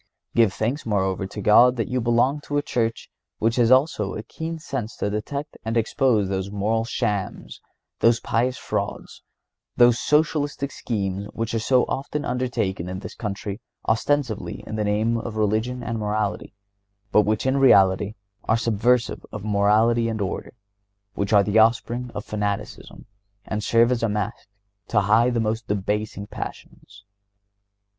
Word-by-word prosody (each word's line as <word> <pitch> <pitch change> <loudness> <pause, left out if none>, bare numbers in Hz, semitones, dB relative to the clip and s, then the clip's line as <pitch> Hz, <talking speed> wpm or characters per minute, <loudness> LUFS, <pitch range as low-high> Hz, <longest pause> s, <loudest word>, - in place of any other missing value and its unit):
(132) 115 - +5
Give 100 -4 +1
thanks, 125 +7 -1
moreover, 95 -2 -1
to 105 - -7
God 120 +5 +6
that 115 -3 -2
you 125 0 -1
belong 120 +5 +2
to 145 - -2
a 145 - +1
Church 115 -4 -2 0.3
which 115 +2 0
has 120 -2 +4
also 130 -6 +3
a 105 - -5
keen 160 +7 -6
sense 135 -8 -5
to 100 - -2
detect 140 +8 -4
and 110 +1 -1
expose 115 -2 +2
those 95 0 -2
moral 105 +3 0
shams, 105 -4 -3 0.4
those 115 0 +4
pious 125 +3 0
frauds, - - -4 0.6
those 120 -1 +5
socialistic 150 -2 +1
schemes 100 -3 -3
which 115 -1 -3
are 115 - +1
so 125 +3 +3
often 145 +2 -3
undertaken 110 -8 -2
in 95 - -4
this 100 - -8
country 100 0 -5 0.3
ostensibly 120 -1 0
in 110 - -5
the 110 - -1
name 110 +3 +1
of 115 -1 -6
religion 110 +4 0
and 115 0 -3
morality, 105 -1 -2 0.6
but 105 - +6
which, 105 +2 0
in 130 +1 +2
reality, 100 -5 +4 0.3
are 110 - +2
subversive 115 +1 +1
of 105 -1 -7
morality 110 +3 +3
and 110 -1 -3
order, 100 +4 -4 0.6
which 100 0 -2
are 100 -2 +6
the 105 +2 +2
offspring 120 +2 +2
of 105 - -5
fanaticism, 105 -1 -4 0.4
and 105 -1 -3
serve 115 +3 +4
as 125 - 0
a 115 - +1
mask 105 -1 -3 0.4
to 105 - +2
hide 115 +5 +3
the - - +2
most 110 -1 -2
debasing 105 +1 -2
passions. 100 0 -9
110 Hz, 160 wpm, -23 LUFS, 105-120 Hz, 0.6 s, God